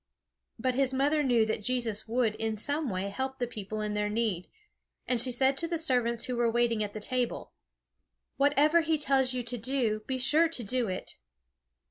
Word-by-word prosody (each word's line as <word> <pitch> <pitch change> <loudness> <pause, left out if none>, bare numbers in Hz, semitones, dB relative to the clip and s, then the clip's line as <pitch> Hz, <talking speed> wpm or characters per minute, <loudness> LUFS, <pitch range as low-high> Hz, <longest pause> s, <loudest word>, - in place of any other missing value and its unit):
But 255 +2 0
his 265 0 +1
mother 290 +3 +2
knew 240 -5 +3
that 220 -1 -2
Jesus 230 -3 -1
would 230 -1 +1
in 220 -1 -2
some 290 +5 -1
way 190 0 -2
help 265 +5 -4
the 245 - -1
people 215 -2 -6
in 210 0 -2
their 210 0 0
need, 210 -5 -1 0.6
and 245 -3 +3
she 255 - +1
said 265 +2 +3
to 335 - -1
the 335 0 -1
servants 245 -6 0
who 250 - -3
were 235 -1 +2
waiting 235 -2 +1
at 205 -1 -5
the - - -3
table: 250 +2 -2 0.8
"Whatever 290 +4 +4
he 320 -1 +1
tells 265 -3 +2
you 250 - -2
to 240 +1 -4
do, 230 -2 0
be 260 - -1
sure 305 +6 +4
to 260 -7 -4
do 245 +2 -1
it." 185 - -5
245 Hz, 195 wpm, -29 LUFS, 220-270 Hz, 0.8 s, Whatever